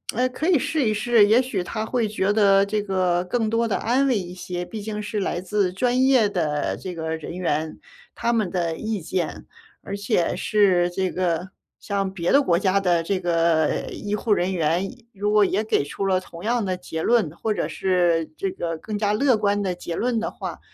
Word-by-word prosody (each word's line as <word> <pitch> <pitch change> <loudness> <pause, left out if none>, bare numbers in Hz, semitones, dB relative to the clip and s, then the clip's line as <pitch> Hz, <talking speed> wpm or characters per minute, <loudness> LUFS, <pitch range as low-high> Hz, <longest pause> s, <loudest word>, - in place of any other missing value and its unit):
呃， 250 +3 +2
可 310 +7 -2
以 340 - +5
试 290 -5 0
一 215 - +2
试。 215 0 +4
也 225 +4 +5
许 245 -8 -2
他 215 +4 -4
会 235 -2 0
觉 205 -1 0
得 200 -2 +5
这 210 +1 -1
个 185 -3 0
更 220 +3 0
多 230 +1 +1
地 215 - 0
安 260 +4 +1
慰 250 - +2
一 180 -2 -5
些， 180 -1 -5
毕 210 +4 -7
竟 210 0 -4
是 210 0 -3
来 175 -2 -2
自 190 -1 0
专 250 +5 +1
业 255 -6 +4
的 150 -7 -1
这 180 -2 -7
个 160 0 -3
人 160 +2 -7
员， 160 -3 -1 0.4
他 235 - 0
们 215 -6 +1
的 170 -3 -1
意 215 -3 -3
见。 170 0 -3 0.4
而 200 0 -5
且 190 -4 0
是 185 -3 +2
这 185 0 -1
个 180 0 -1 0.3
像 195 -2 -2
别 175 -2 -1
的 280 +1 +5
国 170 -7 +2
家 195 0 +2
的 175 -3 +2
这 185 +2 -1
个 165 -2 +1
医 205 0 -5
护 210 +1 -3
人 185 0 0
员， 170 +2 +1
医 240 -2 -19
如 205 +1 -1
果 210 0 +5
也 200 +3 0
给 215 -9 +1
出 195 +7 -4
了 185 -1 +2
同 170 -2 -12
样 235 +1 +1
的 185 -1 -1
结 160 -3 -5
论， 220 -6 +2
或 220 - -2
者 - - -2
是 175 -4 +1
这 195 - -2
个 170 -3 -4
更 210 +5 -5
加 205 -1 +1
乐 255 +2 +3
观 205 -1 +1
的 185 -2 -1
结 175 -1 -6
论 240 -2 0
的 220 - -2
话， - - -7
195 Hz, 235 characters per minute, -23 LUFS, 175-220 Hz, 0.4 s, 以